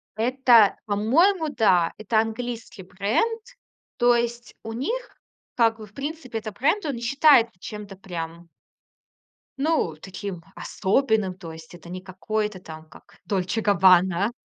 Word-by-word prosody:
Это, 235 -2 +4
по-моему, 305 - +2
да. 185 - +2
Это 215 +1 +1
английский 225 -2 -4
бренд. 210 - -1 0.6
То 240 0 +4
есть 235 0 -3
у 225 0 -6
них 475 - -4 0.4
как 225 -2 +3
бы, 215 - -9
в 205 - -21
принципе, 275 -3 -5
этот 215 -2 -8
бренд, 320 +10 +1
он 285 - -2
не 235 - -7
считает 275 -1 +5
чем-то 205 0 -8
прям... 170 -2 -7 1.1
ну, 285 - 0
таким 190 -2 -7
особенным. 210 -3 0
То 165 -3 -9
есть 160 +1 -13
это 170 0 -13
не 185 +1 -6
какое-то 210 +2 -3
там 160 -2 -11
как - - -18
Dolce 195 +3 -1
Gabbana! 190 0 +4
215 Hz, 135 wpm, -24 LUFS, 185-245 Hz, 1.1 s, считает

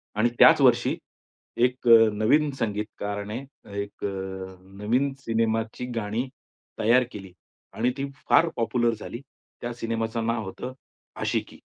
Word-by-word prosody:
आणि 115 +3 +3
त्याच - - +8
वर्षी - - +4 0.6
एक 125 0 +1
अ, 115 -1 +8
नवीन 135 +9 +3
संगीतकाराने 105 0 -3 0.4
एक 100 0 -9
अ, - - 0 0.7
नवीन 130 +6 +1
सिनेमाची 115 -1 -1
गाणी 115 +4 -2 0.5
तयार 120 +4 +5
केली. 95 -3 -9 0.4
आणि 120 +3 +1
ती 140 - -1 0.2
फार 170 - +6
पॉप्युलर 120 0 +1
झाली. 120 +3 -7 0.4
त्या 120 0 -3
सिनेमाचं 115 0 -2
नाव 115 -1 0
होतं 125 +7 -6 0.5
आशिकी. - - -2
115 Hz, 125 wpm, -26 LUFS, 110-125 Hz, 0.7 s, त्याच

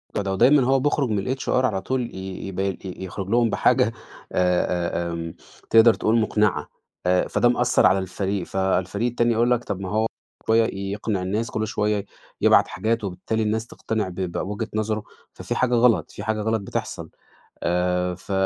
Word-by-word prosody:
الموضوع 105 - 0
ده، 100 - -2
ودايمًا 130 +8 +5
هو 135 0 +4
بيخرج 140 -1 +1
من 105 +5 -1
الHR 135 - -6 0.2
على 100 -6 0
طول 125 +3 -3
ي 95 0 -6
يب 95 -1 -6
ي 95 -2 -1
يُخرج 95 +1 -6
لهم 120 +1 +3
بحاجة - - +3
أ - - -3 0.4
أ 90 -1 0
آمم، 85 0 -5 0.4
تقدر 115 0 +7
تقول 110 +2 +1
مقنعة، 105 -7 +1 0.4
آآ 90 0 +2
فده 120 - +2
مأثّر 120 - +3
على 95 +4 +5
الفريق، 95 +1 -2
فالفريق 95 +3 0
التاني 120 0 +1
يقول 120 +2 +2
لَك 120 -1 +2
طب 100 -2 -4
ما 95 -1 -5
هو 110 +3 +1 0.4
شوية 115 0 +4 0.2
يقنع 105 -2 -2
الناس، 105 +5 -2
كل 110 0 -2
شويّة 105 -1 -1 0.4
يبعت - - +5
حاجات 115 +1 -1
وبالتالي 100 +4 -2
الناس 110 +2 -1
تقتنع 110 -5 -3
ب - - -9
بوِجهة 95 +4 -3
نظره، 110 0 -1 0.3
ففي - - -4
حاجة 125 -1 +1
غلط، 120 -1 +3
في 100 - -8
حاجة 110 0 -1
غلط 110 0 0
بتحصل، 100 - -5 0.5
آآ 90 +1 0
ف 90 - -11
105 Hz, 180 wpm, -23 LUFS, 95-115 Hz, 0.5 s, تقدر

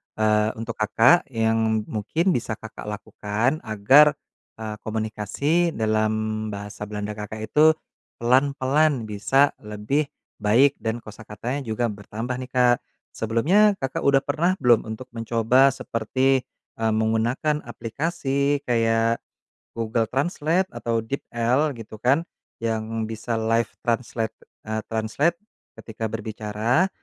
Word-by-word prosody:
eee, 110 0 +2
untuk 115 0 -6
Kakak 115 +10 +4
yang 110 -2 +1
mungkin 155 - 0
bisa 115 -5 -1
Kakak 110 -1 -10
lakukan 105 +6 -2
agar, 130 +7 +5 0.4
eee, 110 -1 -5
komunikasi 110 - -1
dalam 110 0 0
bahasa 105 0 -6
Belanda 105 0 -4
Kakak 110 +1 -6
itu 155 +1 +6 0.4
pelan-pelan 135 +2 +2
bisa 110 +7 +2
lebih 105 +8 -2 0.3
baik 120 +7 +4
dan 115 +1 -3
kosakatanya 110 +5 -6
juga 110 +1 0
bertambah 110 +5 -5
nih, 130 0 -7
Kak. 125 -1 +4 0.3
Sebelumnya 170 - +3
Kakak 135 -5 -2
udah 135 0 +4
pernah 175 +4 +1
belum 120 - +3
untuk 125 +4 -7
mencoba 115 +3 +3
seperti, 130 +1 0 0.3
eee, 110 -1 +1
menggunakan 115 +7 +1
aplikasi 140 +3 -1
kayak 115 -2 +2 0.6
Google 115 0 0
Translate 165 - 0
atau 115 -1 -2
DeepL 125 +3 0
gitu 110 -2 -10
kan, 135 +8 +3 0.4
yang 110 0 -2
bisa 110 +1 -4
live 115 0 +1 0.2
translate, 115 -1 -1 0.3
eee, 110 0 -3
translate 115 +10 0 0.4
ketika 110 0 -5
berbicara? 110 - 0
115 Hz, 115 wpm, -24 LUFS, 110-135 Hz, 0.6 s, itu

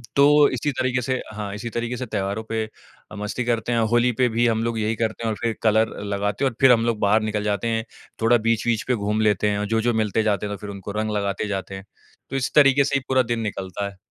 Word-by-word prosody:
तो 145 +1 +6
इसी 135 +3 -1
तरीक़े 125 -1 +1
से 130 +1 -1
हाँ, 105 -2 -5
इसी 115 +2 -5
तरीक़े 120 +1 -3
से 130 - -4
त्योहारों 105 0 -3
पे 110 -1 -1 0.5
मस्ती 105 +4 -3
करते 120 0 -1
हैं। 115 - +2
होली 120 +1 +3
पे 125 - +5
भी 120 +1 +2
हम 115 0 +1
लोग 115 -1 -1
यही 110 +1 0
करते 115 +1 -2
हैं 115 - 0
और - - -2
फ़िर 115 -1 -1
कलर 110 0 +2
लगाते 105 +5 -1
हैं - - +3
और 115 - -17
फ़िर 130 -2 +7
हम 115 -1 +4
लोग 115 -3 0
बाहर 105 +2 +3
निकल 105 -1 -2
जाते 105 +1 -1
हैं। 115 -1 0 0.4
थोड़ा 120 +2 +5
बीच-वीच 115 0 +1
पे 125 - +2
घूम 105 +1 -1
लेते 105 -1 +2
हैं 100 0 -1
और 105 - -1
जो-जो 115 +2 +1
मिलते 110 0 +1
जाते 105 -1 0
हैं 105 0 -3
तो - - -10
फ़िर 105 - -7
उनको 100 0 -7
रंग 110 0 -1
लगाते 100 +1 -2
जाते 95 -1 -4
हैं। 95 +1 -9 0.4
तो 135 - -5
इस 130 -2 -1
तरीक़े 140 -1 +6
से 140 0 -1
ही 135 - +1
पूरा 130 -1 +3
दिन 115 - -2
निकलता 100 -2 -4
है। 100 -1 -11
110 Hz, 260 wpm, -23 LUFS, 105-120 Hz, 0.5 s, फ़िर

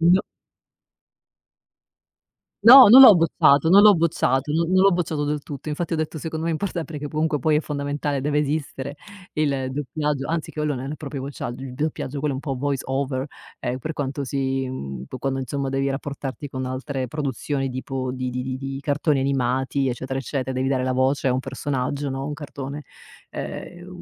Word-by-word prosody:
No. 175 +3 +5 2.4
No, 255 +2 +11
non 250 +5 +10
l'ho 235 -6 +11
bocciato, 160 -3 +4
non 195 +3 +7
l'ho 210 -1 +8
bocciato, 155 -4 +1
non 165 +2 +1
non 185 0 +5
l'ho 195 - +6
bocciato 165 -4 -1
del 150 0 -2
tutto. 145 +1 -7
Infatti 165 +3 -3
ho - - +1
detto: 155 0 -3
"Secondo 160 +1 -4
me - - +1
è - - 0
importante, 165 -2 -4
che 145 - -5
po 155 +1 -3
comunque 155 -1 +1
poi 155 +3 +2
è - - +2
fondamentale, 145 -1 -3
deve 145 +2 0
esistere 145 -1 -3 0.4
il 140 -4 0
doppiaggio." 145 0 -2
Anzi 160 -1 -2
quello 150 -1 -2
non 135 +2 -5
è 155 - -5
proprio 140 -2 -6
uacciagg 130 -3 -5
uib 130 -1 -8
doppiaggio 145 -1 -3
quello 145 -1 -1
un 130 - -4
po' 135 -4 -3
Voice 140 0 -2
Over, 135 0 -1 0.3
ehm, 125 +1 -2
per 155 +5 -4
quanto 140 -1 -3
si, 135 0 -1
mhmm, 70 - -6
po 130 - -8
quando, 135 +1 -2
insomma, 135 +1 -3
devi 135 +1 0
rapportarti 140 0 -5
con 130 0 -4
altre 130 +1 -3
produzioni 135 0 -3
di 130 +1 -4
po 130 -2 -3
di 130 0 -3
di 125 0 -3
di 130 0 -4
di 135 0 -5
cartoni 145 0 +1
animati 135 0 0
eccetera, 130 +2 -3
eccetera, 130 -1 -3
devi 130 +1 -1
dare 135 -1 +1
la 130 0 0
voce 130 +2 +1
a - - +2
un 125 - 0
personaggio, 140 +1 -3
no, 135 +1 -4
un 150 - -4
cartone 145 -1 -7 0.5
ehm, 175 0 -7
140 Hz, 195 wpm, -23 LUFS, 130-150 Hz, 2.4 s, No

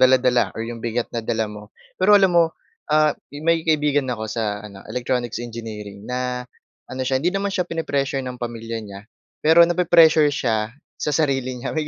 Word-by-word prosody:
dala-dala, 130 -1 +4
or 115 - -3
'yong 115 0 -6
bigat 120 +1 -2
na 115 - -2
dala 110 0 -1
mo. 105 0 -10 0.3
Pero 205 +2 +7
alam 190 -2 +4
mo, 170 -1 +6 0.4
ah, 155 0 +4 0.2
may 160 +3 +1
kaibigan 150 -3 +1
ako 110 -3 -3
sa 105 -2 -3
ano, 100 -2 -10
electronics 120 0 -2
engineering, 110 -4 -7
na, 125 0 -3 0.4
ano 130 +1 -6
siya, 130 0 +1
hindi 170 - +1
naman 195 0 -1
siya 180 -1 -1
pini-pressure 140 -4 -1
ng 125 -1 -7
pamilya 115 -1 -5
niya, 100 -2 -9 0.4
pero 160 +2 +6
na-pi-pressure 165 -4 +5
siya 110 -5 -1 0.2
sa 150 - -2
sarili 135 -4 0
niya. - - -3
May 155 - 0
125 Hz, 175 wpm, -22 LUFS, 115-155 Hz, 0.4 s, Pero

